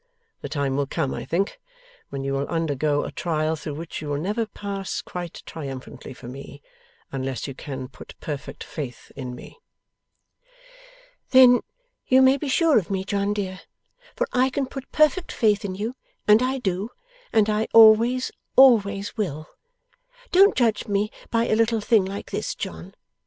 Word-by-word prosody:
The - - -6
time 140 -2 -1
will 140 -1 0
come, 135 - -2
I - - -5
think, 195 - -1 0.5
when 135 -1 -5
you 135 0 -2
will 135 +1 -1
undergo 150 -3 0
a - - -5
trial 160 -2 -1
through 150 -1 -6
which 165 +1 -6
you 150 - -5
will 145 - -1
never 210 +8 -1
pass 200 -2 -5
quite 175 -2 -7
triumphantly 135 -5 -8
for 125 - -11
me, 140 +2 -10 0.5
unless 135 -1 -3
you 135 - -5
can 130 -1 -6
put 130 - -13
perfect 145 -3 -6
faith 135 -6 -7
in 125 -2 -6
me.' 295 - -13 1.7
'Then 255 -2 +7 0.5
you 260 +1 +6
may 260 +1 +6
be 280 +1 -4
sure 315 0 +4
of 195 - -8
me, 190 -1 -1
John 200 +1 -1
dear, 190 -3 -3 0.5
for - - 0
I 255 +1 +3
can 275 +1 -1
put 270 0 -9
perfect 310 +4 +2
faith 215 -1 +2
in 190 -2 -4
you, 220 +6 -4 0.3
and 210 +2 +7
I 260 +1 0
do, 195 -3 -2 0.4
and 220 -2 +4
I 215 +1 0
always, 230 +3 +6 0.2
always 205 -6 +5
will. 155 - -3 0.8
Don't 390 +3 +6
judge 230 -3 +1
me 205 +1 0 0.2
by 230 0 +1
a - - +2
little 230 0 +2
thing 210 -2 +3
like 195 +1 -6
this, - - -3
John. - - -7
200 Hz, 170 wpm, -24 LUFS, 150-230 Hz, 1.7 s, Then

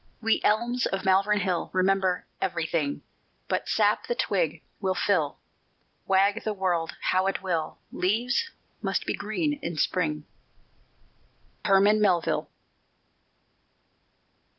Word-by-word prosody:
_We 225 0 +2
elms 235 +3 +2
of 195 - -3
Malvern 200 +2 +3
Hill 185 -3 -1
Remember 185 -1 +1 0.2
everything; 165 -5 -1 0.4
But - - -2
sap - - +2
the 485 - -1
twig - - 0 0.2
will 190 -2 0
fill: 170 -9 +1 0.7
Wag 200 +3 +3
the 215 - -1
world 175 -4 -1 0.2
how 185 +1 +2
it 195 - -2
will, 165 -4 -2
Leaves 235 - 0 0.3
must - - -1
be - - -1
green 290 +9 -2
in 170 -1 -4
Spring._ 150 -3 0 1.4
HERMAN 200 +2 +5
MELVILLE. 180 -5 +1
190 Hz, 110 wpm, -27 LUFS, 180-210 Hz, 1.4 s, HERMAN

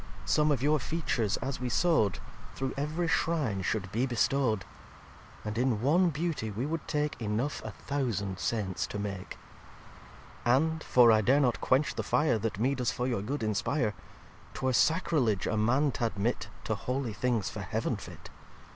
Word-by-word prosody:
Some 150 0 +3
of 135 -3 0
your 150 +1 +3
Features, 125 - -1
as 135 +1 -3
we 125 -1 -2
sow'd, 120 - +2 0.4
Through 135 -1 -2
ev'ry 155 +5 -1
Shrine 150 - 0
should 95 -1 -2
be 120 +6 0
bestow'd. 120 -4 +1 0.8
And 105 +2 -2
in 125 -4 +1
one 165 - +3
Beauty 155 -7 -2
we 110 +5 -3
would 160 +2 -3
take 150 -3 -1
Enough 115 +7 -1
a - - -5
thousand 110 -9 -3
Saints 100 -5 -1
to - - -5
make. 100 -2 -5 1.1
xviii 120 +1 +4
"And 160 +3 0
(for 120 -2 +6
I 110 -1 +5
dare 130 +7 +4
not 125 -5 +1
quench 135 +4 +2
the - - -2
Fire 150 -7 +2
That 110 -2 -2
me 125 +6 +2
does 125 -3 0
for 125 - -2
your 120 -6 -1
good 125 +4 -3
inspire) 110 +2 0 0.6
'Twere 130 -1 0
Sacriledge 135 - +2
a - - 0
Man 130 +7 +2
t'admit 115 -1 -1 0.2
To 110 - -1
holy 125 +3 -2
things, 115 -3 0
for - - -6
Heaven - - -1
fit. - - -10
125 Hz, 170 wpm, -30 LUFS, 110-145 Hz, 1.1 s, for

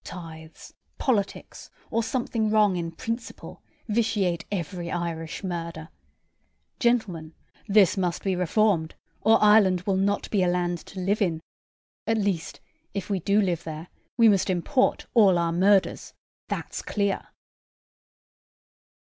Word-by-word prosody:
Tithes, 160 -2 -10 0.2
politics, 210 -7 -2 0.2
or 230 - +1
something 225 -2 -1
wrong 210 -3 +3
in 170 -1 -3
principle, 230 +7 -6 0.3
vitiate 210 -6 0
every 175 -2 -4
Irish 170 0 -4
murder. 170 -3 -5 0.9
Gentlemen, 185 -10 0 0.3
this 200 -2 +4
must 180 -3 -1
be 190 -2 0
reformed, 180 -1 +1 0.3
or 225 +1 +5
Ireland 205 -4 +5
will 190 +1 0
not 200 +1 0
be 205 - +2
a 180 - +2
land 175 -1 0
to 190 - -8
live 195 +4 0
in; 170 -5 +1 0.7
at 225 0 +2
least, 195 -6 -2 0.4
if 200 +1 -4
we 195 - +1
do 200 +4 +2
live 175 -5 0
there, 160 +2 -7 0.3
we 230 -2 +6
must 200 -2 +3
import 190 +9 +1
all 200 -6 +5
our 170 -1 0
murders, 190 +3 +2 0.3
that's - - -4
clear." 200 -2 -2
190 Hz, 130 wpm, -25 LUFS, 170-210 Hz, 0.9 s, we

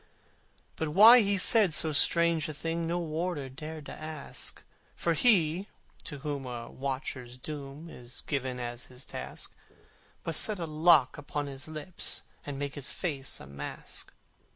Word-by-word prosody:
But 160 - -1
why 220 +10 +9
he 200 -2 +4
said 190 -3 +6
so 160 - +3
strange 165 +1 +3
a 155 - -5
thing 165 +2 -2
No 170 +1 0
warder 165 -3 -2
dared 155 +3 -8
to - - -8
ask: 155 -1 -7 0.3
For 170 - +1
he 180 -3 +4 0.4
to 150 - -5
whom 140 -1 -4
a 120 -1 -6
watcher's 130 -2 -4
doom 145 +3 -7
Is 125 -5 -9
given 130 -3 -2
as 120 0 -5
his 125 +1 -10
task, - - -6 0.7
Must 165 - +2
set 215 -2 +2
a 170 - -3
lock 155 -3 +4
upon 145 0 -3
his 135 0 -6
lips, 155 +3 -3 0.2
And 140 -1 -4
make 140 0 -3
his 145 -3 -2
face 140 -7 -3
a - - -10
mask. 70 +1 -7
150 Hz, 155 wpm, -30 LUFS, 135-170 Hz, 0.7 s, why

